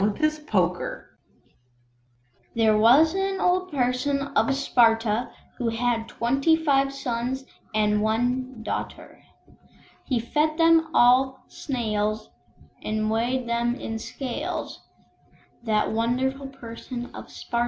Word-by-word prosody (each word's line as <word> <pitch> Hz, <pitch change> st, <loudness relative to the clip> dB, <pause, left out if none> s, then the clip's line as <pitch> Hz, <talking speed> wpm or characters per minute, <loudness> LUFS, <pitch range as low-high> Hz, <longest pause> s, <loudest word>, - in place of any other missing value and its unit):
There 220 Hz, -2 st, +4 dB
was 260 Hz, +10 st, +5 dB
an 385 Hz, 0 st, -1 dB
Old 365 Hz, +1 st, +1 dB
Person 265 Hz, +1 st, 0 dB, 0.2 s
of 225 Hz, +5 st, +3 dB
Sparta, 230 Hz, -4 st, +2 dB, 0.3 s
Who 240 Hz, -2 st, 0 dB
had 230 Hz, 0 st, -1 dB
twenty 275 Hz, +7 st, +2 dB
five 275 Hz, -4 st, +2 dB
sons 260 Hz, 0 st, -3 dB, 0.3 s
and 210 Hz, -1 st, +2 dB
one 245 Hz, +2 st, -1 dB
"darter;" -, -, -6 dB, 0.8 s
He 255 Hz, -, -1 dB
fed 305 Hz, +6 st, 0 dB
them 330 Hz, -1 st, +4 dB
on 260 Hz, +2 st, +5 dB
Snails, 215 Hz, -5 st, -2 dB, 0.5 s
and 215 Hz, 0 st, -1 dB
weighed 240 Hz, +3 st, 0 dB
them 235 Hz, +1 st, 0 dB
in 225 Hz, -3 st, -5 dB
scales, 255 Hz, +2 st, -5 dB, 0.8 s
That 220 Hz, -2 st, 0 dB
wonderful 255 Hz, +4 st, -1 dB
Person 245 Hz, -1 st, -8 dB
of -, -, -10 dB
Sparta. 235 Hz, -, -4 dB
245 Hz, 100 wpm, -25 LUFS, 225-275 Hz, 0.8 s, was